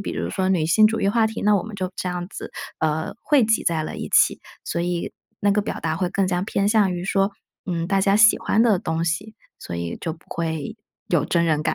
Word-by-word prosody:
比 -, -, -4 dB
如 85 Hz, +1 st, -3 dB
说 185 Hz, 0 st, -1 dB
女 175 Hz, -5 st, +2 dB
性 215 Hz, +6 st, +5 dB
主 225 Hz, +1 st, -1 dB
义 -, -, +2 dB
话 225 Hz, +1 st, +3 dB
题， 220 Hz, -, -5 dB
那 210 Hz, 0 st, +4 dB
我 185 Hz, -, -1 dB
们 220 Hz, -1 st, -8 dB
就 185 Hz, -1 st, -3 dB
这 185 Hz, -, -3 dB
样 175 Hz, 0 st, -3 dB
子， -, -, -7 dB, 0.3 s
呃， 160 Hz, 0 st, -1 dB
汇 285 Hz, -5 st, +4 dB
集 220 Hz, 0 st, +2 dB
在 160 Hz, -2 st, +1 dB
了 -, -, -6 dB
一 -, -, -5 dB
起。 -, -, +4 dB, 0.2 s
所 170 Hz, -, -2 dB
以 175 Hz, 0 st, -2 dB, 0.3 s
那 205 Hz, -, +3 dB
个 205 Hz, +1 st, +2 dB
表 -, -, -5 dB
达 160 Hz, -1 st, -1 dB
会 180 Hz, -2 st, 0 dB
更加 185 Hz, -2 st, 0 dB
偏 200 Hz, -2 st, 0 dB
向 210 Hz, -4 st, +3 dB
于 175 Hz, 0 st, -4 dB
说， 195 Hz, +1 st, +1 dB, 0.3 s
嗯， 170 Hz, -2 st, -2 dB
大 195 Hz, 0 st, +1 dB
家 195 Hz, +1 st, +3 dB
喜 215 Hz, +1 st, +6 dB
欢 220 Hz, -, +2 dB
的 215 Hz, -6 st, +3 dB
东 160 Hz, 0 st, -2 dB
西， 200 Hz, +6 st, -2 dB, 0.2 s
所 85 Hz, -, -6 dB
以 85 Hz, 0 st, -4 dB
就 165 Hz, -1 st, -3 dB
不 160 Hz, -, -23 dB
会 165 Hz, +4 st, -3 dB, 0.3 s
有 160 Hz, -4 st, +2 dB
真 170 Hz, -1 st, +2 dB
人 155 Hz, -2 st, +1 dB
感。 155 Hz, -, 0 dB
180 Hz, 270 characters per minute, -23 LUFS, 165-205 Hz, 0.3 s, 喜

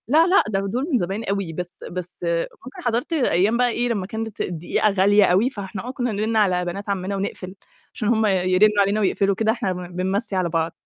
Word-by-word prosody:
لا، 315 Hz, +7 st, +5 dB
لأ، 375 Hz, +2 st, +5 dB
ده 200 Hz, -2 st, 0 dB
دُول 250 Hz, +9 st, -2 dB
من 260 Hz, -, +4 dB
زمان 195 Hz, +2 st, -2 dB
أوي، 195 Hz, -5 st, -2 dB
بس 175 Hz, +1 st, -7 dB
بس 180 Hz, 0 st, -6 dB, 0.4 s
ممكن 260 Hz, -, -10 dB
حَضرت 240 Hz, +7 st, -1 dB
أيام 225 Hz, -, +2 dB
بقى 245 Hz, 0 st, +3 dB
إيه 240 Hz, +1 st, -1 dB
لمّا 205 Hz, -5 st, -1 dB
كانت 220 Hz, 0 st, -5 dB
الدقيقة 175 Hz, +5 st, 0 dB
غالية 205 Hz, +1 st, +4 dB
أوي، 190 Hz, +7 st, +3 dB
فإحنا 200 Hz, -2 st, -7 dB
آه -, -, -3 dB
كنّا 245 Hz, -2 st, -2 dB
نرِن 215 Hz, +2 st, -1 dB
على 185 Hz, -4 st, +2 dB
بنات 195 Hz, +4 st, -5 dB
عَمّنا 195 Hz, 0 st, -2 dB
ونقفل، 195 Hz, -1 st, -5 dB, 0.4 s
عشان 215 Hz, -, -3 dB
هُم 220 Hz, -1 st, +3 dB
يرّنوا 195 Hz, +2 st, +3 dB
علينا 200 Hz, +2 st, +1 dB
ويقفلوا، 200 Hz, -1 st, +1 dB
كده 220 Hz, +2 st, +2 dB
إحنا 200 Hz, -5 st, -2 dB
ب 180 Hz, -1 st, -8 dB
بنمَّسي 190 Hz, +3 st, 0 dB
على 180 Hz, -2 st, 0 dB
بعض. 165 Hz, 0 st, -1 dB
200 Hz, 210 wpm, -22 LUFS, 185-225 Hz, 0.4 s, لا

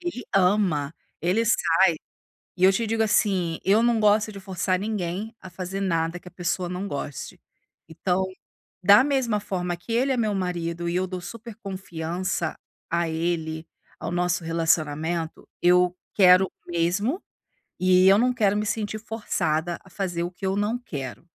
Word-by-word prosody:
Ele 345 Hz, -8 st, -5 dB
ama, 180 Hz, -6 st, +2 dB, 0.3 s
ele 190 Hz, +7 st, +1 dB
sai 230 Hz, -, +4 dB, 1.0 s
E 185 Hz, -, +2 dB
eu 190 Hz, -, +7 dB
te 230 Hz, +3 st, 0 dB
digo, 225 Hz, 0 st, +1 dB
assim. 190 Hz, -7 st, +1 dB
Eu 205 Hz, +4 st, +4 dB
não 235 Hz, -1 st, +3 dB
gosto 215 Hz, +1 st, +3 dB
de 200 Hz, -, -9 dB
forçar 185 Hz, -1 st, -1 dB
ninguém, 205 Hz, +1 st, -3 dB
a 190 Hz, -, -10 dB
fazer 185 Hz, +2 st, -5 dB
nada 165 Hz, -2 st, 0 dB
que 180 Hz, -, -12 dB
a -, -, -16 dB
pessoa 175 Hz, 0 st, -2 dB
não 180 Hz, +3 st, -4 dB
goste. 140 Hz, -2 st, -6 dB, 0.5 s
Então, 180 Hz, +3 st, 0 dB, 0.6 s
da 200 Hz, +6 st, +8 dB
mesma 265 Hz, -6 st, +1 dB
forma 180 Hz, -3 st, -3 dB
que 175 Hz, +7 st, -10 dB
ele 255 Hz, +4 st, +2 dB
é 260 Hz, -, +1 dB
meu 215 Hz, -3 st, +1 dB
marido 170 Hz, -2 st, -2 dB
e 170 Hz, -, -2 dB
eu 185 Hz, +1 st, 0 dB
dou 185 Hz, 0 st, -5 dB
super 230 Hz, +4 st, -9 dB
confiança 185 Hz, -4 st, -3 dB, 0.3 s
a 170 Hz, 0 st, 0 dB
ele, 160 Hz, -1 st, -2 dB, 0.3 s
ao -, -, -4 dB
nosso 175 Hz, 0 st, 0 dB
relacionamento, 165 Hz, 0 st, -1 dB
eu, 180 Hz, 0 st, +4 dB, 0.2 s
quero 185 Hz, -1 st, +7 dB
o 175 Hz, -, -13 dB
mesmo, 185 Hz, -, 0 dB, 0.6 s
eh, 185 Hz, 0 st, +5 dB
eu 195 Hz, +1 st, +7 dB
não 250 Hz, +2 st, +3 dB
quero 205 Hz, -4 st, +2 dB
me 210 Hz, -, -1 dB
sentir 215 Hz, 0 st, -2 dB
forçada 175 Hz, -7 st, -2 dB
a 190 Hz, -, -16 dB
fazer 175 Hz, -3 st, -2 dB
o 175 Hz, -, -3 dB
que 185 Hz, -, -10 dB
eu 190 Hz, +1 st, 0 dB
não 210 Hz, +3 st, 0 dB
quero. 145 Hz, -, -7 dB
185 Hz, 170 wpm, -25 LUFS, 170-210 Hz, 1.0 s, da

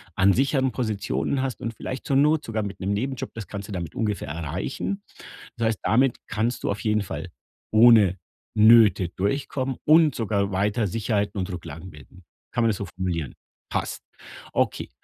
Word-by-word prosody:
an 95 Hz, +1 st, +4 dB
sicheren 135 Hz, +1 st, +1 dB
Positionen 105 Hz, -, -1 dB
hast, 130 Hz, -2 st, -3 dB
und 115 Hz, -, -3 dB
vielleicht 130 Hz, +3 st, -6 dB
zur 140 Hz, -, +1 dB
Not 150 Hz, +2 st, +3 dB
sogar 110 Hz, -1 st, -2 dB
mit 100 Hz, -2 st, -6 dB
'nem 95 Hz, +1 st, -2 dB
Nebenjob, 130 Hz, +4 st, -3 dB
das 115 Hz, -4 st, -7 dB
kannst 100 Hz, 0 st, -6 dB
du -, -, -9 dB
damit 90 Hz, -4 st, -5 dB
ungefähr 105 Hz, -6 st, -2 dB
erreichen. 85 Hz, -, -4 dB, 0.5 s
Das 115 Hz, -1 st, +1 dB
heißt, 110 Hz, -3 st, -1 dB
damit 125 Hz, +2 st, +3 dB
kannst 115 Hz, +3 st, -1 dB
du -, -, 0 dB
auf 100 Hz, -, -4 dB
jeden 105 Hz, -1 st, +1 dB
Fall -, -, -6 dB, 0.4 s
ohne 110 Hz, -5 st, +6 dB, 0.4 s
Nöte 110 Hz, -3 st, +6 dB
durchkommen 130 Hz, +7 st, -2 dB
und 155 Hz, 0 st, +6 dB
sogar 100 Hz, -3 st, -1 dB
weiter 105 Hz, +3 st, +1 dB
Sicherheiten 105 Hz, 0 st, -1 dB
und 95 Hz, +1 st, -2 dB
Rücklagen 85 Hz, -1 st, -7 dB
bilden. 75 Hz, +4 st, -15 dB, 0.3 s
Kann 120 Hz, -, +1 dB
man 115 Hz, -, +4 dB
das 105 Hz, -, 0 dB
so 100 Hz, -, -4 dB
formulieren? 90 Hz, -5 st, -3 dB, 0.4 s
Passt. -, -, -2 dB, 0.5 s
Okay, -, -, -1 dB
105 Hz, 170 wpm, -25 LUFS, 95-125 Hz, 0.5 s, ohne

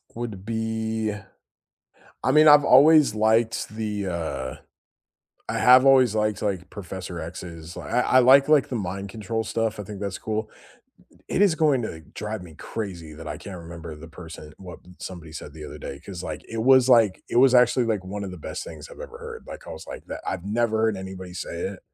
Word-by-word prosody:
Would 110 Hz, -5 st, -6 dB
be 110 Hz, -1 st, -2 dB, 1.1 s
I -, -, +1 dB
mean, 155 Hz, +2 st, +6 dB
I've 145 Hz, -1 st, +8 dB
always 145 Hz, -1 st, +6 dB
liked 110 Hz, +1 st, +2 dB
the, 105 Hz, -2 st, -3 dB
uh 80 Hz, -7 st, -3 dB, 1.0 s
I -, -, -1 dB
have 130 Hz, +1 st, +7 dB
always 130 Hz, -5 st, +5 dB
liked 105 Hz, -1 st, 0 dB
like 95 Hz, -4 st, -2 dB
Professor 90 Hz, -3 st, -7 dB
X's, 85 Hz, 0 st, -8 dB
I 125 Hz, -, -1 dB
I 130 Hz, -, +4 dB
like, 135 Hz, +3 st, +6 dB
like 150 Hz, -3 st, +4 dB
the 125 Hz, -, -3 dB
mind 100 Hz, 0 st, -4 dB
control 110 Hz, +1 st, -3 dB
stuff, 115 Hz, -2 st, -2 dB
I -, -, -4 dB
think 100 Hz, 0 st, -8 dB
that's 100 Hz, -2 st, -3 dB
cool. 110 Hz, 0 st, -3 dB, 0.8 s
It -, -, 0 dB
is 195 Hz, -5 st, +5 dB
going 150 Hz, -5 st, +3 dB
to 80 Hz, -7 st, -5 dB
drive 105 Hz, -1 st, -5 dB
me 85 Hz, -3 st, -12 dB
crazy 90 Hz, -8 st, -6 dB
that 80 Hz, +1 st, -10 dB
I 75 Hz, -, -5 dB
can't 95 Hz, -3 st, -8 dB
remember 85 Hz, -1 st, -9 dB
the 80 Hz, +2 st, -11 dB
person 80 Hz, -2 st, -11 dB
what 90 Hz, -2 st, -10 dB, 0.2 s
somebody 85 Hz, -4 st, -8 dB
said 75 Hz, -2 st, -8 dB
the 80 Hz, -1 st, -9 dB
other -, -, -9 dB
day, 70 Hz, -, -7 dB
'cause 90 Hz, +2 st, -8 dB
like 80 Hz, -2 st, -6 dB
it 115 Hz, 0 st, -3 dB
was 130 Hz, 0 st, +6 dB
like 115 Hz, -6 st, +4 dB
it -, -, -1 dB
was 130 Hz, +1 st, +6 dB
actually 125 Hz, 0 st, +4 dB
like 105 Hz, -4 st, -1 dB
one 100 Hz, +2 st, -5 dB
of 95 Hz, -, -5 dB
the 90 Hz, -, -9 dB
best -, -, -6 dB
things -, -, -10 dB
I've -, -, -12 dB
ever -, -, -8 dB
heard, 465 Hz, -1 st, -9 dB
like, -, -, -10 dB
I -, -, -8 dB
was -, -, -9 dB
like -, -, -8 dB
that -, -, -5 dB
I've 95 Hz, -2 st, -3 dB
never 110 Hz, +2 st, 0 dB
heard 110 Hz, -2 st, +2 dB
anybody 95 Hz, -1 st, -8 dB
say 90 Hz, -, -5 dB
it 95 Hz, +1 st, -4 dB
105 Hz, 205 wpm, -25 LUFS, 90-120 Hz, 1.1 s, I've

